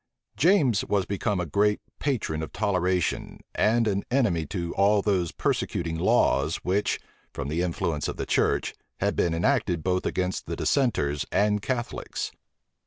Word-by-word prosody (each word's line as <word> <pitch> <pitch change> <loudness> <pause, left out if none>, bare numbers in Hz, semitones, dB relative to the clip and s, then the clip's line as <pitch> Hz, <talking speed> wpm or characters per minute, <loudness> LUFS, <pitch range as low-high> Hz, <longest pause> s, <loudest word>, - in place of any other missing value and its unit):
James 145 - +3
was 100 -2 +1
become 100 0 -1
a 90 - -1
great 105 +6 +2 0.2
patron 110 - -1
of 80 - -5
toleration, 90 -4 0
and 115 +1 +2
an 100 -1 0
enemy 100 - +1
to 85 -1 -3
all 100 +1 +3
those 95 -5 +1
persecuting 85 -1 -1
laws 80 - +2
which, 95 +3 0 0.3
from 70 0 -5
the 80 +3 0
influence 85 -3 -1
of - - -4
the - - -3
church, - - +1 0.3
had - - 0
been 85 -2 +1
enacted 90 - +1
both 90 0 0
against 90 0 -2
the - - -3
dissenters 75 - +1
and 105 0 +2
Catholics. 120 +2 -3
95 Hz, 150 wpm, -26 LUFS, 85-105 Hz, 0.3 s, James